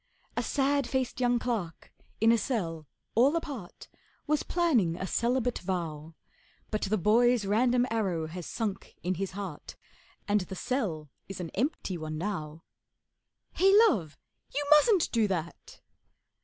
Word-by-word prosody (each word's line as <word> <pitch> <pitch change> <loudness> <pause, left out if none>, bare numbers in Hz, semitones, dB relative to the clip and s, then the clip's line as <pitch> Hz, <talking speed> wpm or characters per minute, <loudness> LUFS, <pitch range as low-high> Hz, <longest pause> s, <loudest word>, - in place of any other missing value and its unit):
A - - +1
sad 280 -1 +1
faced 260 -2 -1
young 245 -1 +3
clerk 225 -9 -4 0.3
in 225 +1 +5
a 235 - +4
cell 165 - -3 0.3
all 265 +7 +4
apart 280 - -6 0.4
Was 300 0 +1
planning 255 - +2
a 185 - -3
celibate 245 +4 0
vow; 165 -4 -4 0.6
But 215 - -1
the 210 +2 +1
boy's 230 +3 +3
random 245 +4 +3
arrow 190 -8 0
has 170 +2 -7
sunk 210 -4 -4
in 180 +2 0
his 190 +1 -4
heart, 190 -6 -7 0.5
And 205 0 +2
the 185 +1 -7
cell 185 - -2 0.2
is 195 - -6
an 170 -3 -5
empty 215 - -2
one 155 0 -5
now. 160 -4 -4 0.9
'Hey, 385 +2 +4 0.2
Love, 160 - -2 0.4
you 290 +1 0
mustn't 330 +5 +5
do 225 -3 +2
that! 170 -4 -5
210 Hz, 140 wpm, -29 LUFS, 175-250 Hz, 0.9 s, in